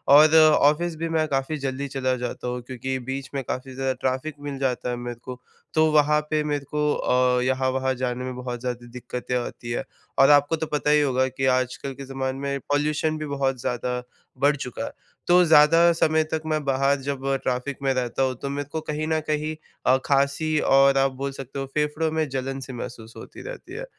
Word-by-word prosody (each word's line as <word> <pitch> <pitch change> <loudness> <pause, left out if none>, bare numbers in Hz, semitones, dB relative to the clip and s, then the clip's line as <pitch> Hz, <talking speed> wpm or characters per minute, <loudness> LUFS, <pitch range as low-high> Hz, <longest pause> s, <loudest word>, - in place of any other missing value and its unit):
और 155 +2 +7
ऑफ़िस 155 +2 +5
भी 165 +1 -3
मैं 160 -1 +1
काफ़ी 140 +2 -1
जल्दी 135 0 -3
चला 130 -1 -1
जाता 125 0 -5
हूँ, 125 0 -3
क्योंकि 130 +1 -4
बीच 130 +2 -5
में 135 - -1
काफ़ी 130 +2 -5
ज़्यादा 135 0 0
ट्रैफिक 130 +4 -1
मिल 145 -1 -4
जाता 125 -2 -1
है 125 - -1
मेरे 120 -1 -6
को। 125 -1 -7 0.3
तो 155 -1 +4
वहाँ 150 0 +4
पे 155 -1 +1
मेरे 145 -2 -2
को 150 0 +2
अ, 125 0 +2
यहाँ 130 0 +1
वहाँ 130 0 0
जाने 125 0 -2
में 130 0 -5
बहुत 125 -1 -5
ज़्यादा 120 -1 -4
दिक्कतें 125 0 -5
आती 120 -1 -5
हैं, 120 - -1 0.4
और 135 - +7
आपको 145 +2 +5
तो 160 0 -3
पता 150 0 -1
ही 150 0 +5
होगा 130 -2 +2
कि 130 +1 -3
आजकल 130 +2 -3
के 135 +1 -9
ज़माने 135 0 -3
में 140 0 -2
पॉल्यूशन 150 +2 +1
भी 155 - -4
बहुत 135 -2 -1
ज़्यादा 125 +1 -2 0.4
बढ़ 145 +1 +4
चुका 125 -5 -5
है। - - -6 0.4
तो 180 +1 +6
ज़्यादा 165 +2 +6
समय 160 -1 +2
तक 160 - -1
मैं 155 -1 0
बाहर 135 +1 +2
जब 135 0 -4 0.2
ट्रैफिक 130 +2 -2
में 135 -1 +2
रहता 130 0 -1
हूँ 130 -1 0
तो 140 - -3
मेरे 140 0 -3
को 160 - -3
कहीं 155 0 -3
न 160 0 +1
कहीं 155 +1 -1 0.3
अ, 130 +1 +5
खाँसी 140 +3 +1
और 135 0 +5
आप 135 0 +3
बोल 140 0 -1
सकते 135 0 -7
हो 135 - -2
फेफड़ों 150 +1 0
में 160 -1 0
जलन-सी 135 0 -4
महसूस 115 -2 -8
होती - - -10
रहती - - -9
है - - -5
135 Hz, 210 wpm, -24 LUFS, 130-150 Hz, 0.4 s, और